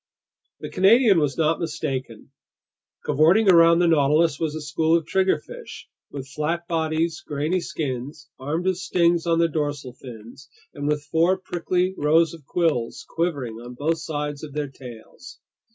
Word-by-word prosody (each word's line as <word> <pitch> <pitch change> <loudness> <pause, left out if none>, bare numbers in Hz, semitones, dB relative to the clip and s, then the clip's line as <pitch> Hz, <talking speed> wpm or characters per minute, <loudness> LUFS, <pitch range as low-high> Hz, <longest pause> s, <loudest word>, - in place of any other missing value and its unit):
The - - -7
Canadian 200 +1 +5
was 145 -3 -1
not 160 0 +1
mistaken. 135 -8 -5 0.7
Cavorting 160 +9 +4
around 170 -2 +6
the 175 0 +3
Nautilus 155 0 +3
was 155 -2 -2
a 155 - -5
school 160 +2 +1
of 165 - -5
triggerfish 190 - -2 0.2
with 135 -2 -7
flat 155 +5 -3
bodies, 160 0 -1
grainy 155 +4 -2
skins, 145 0 -5
armed 155 +7 -3
with 185 -1 +1
stings 170 -1 +1
on 165 0 +2
their 170 0 +3
dorsal 145 -5 -3
fins, 120 0 -12 0.2
and 145 -1 -4
with 150 -1 0
four 170 +4 +3
prickly 180 0 -1
rows 160 +3 +3
of 155 -4 -14
quills 145 -7 -1
quivering 140 -10 -3
on 125 +1 -10
both 160 +5 -1
sides 150 -2 -4
of 150 -3 -8
their 150 -1 -3
tails. 125 - -12
155 Hz, 150 wpm, -23 LUFS, 145-170 Hz, 0.7 s, around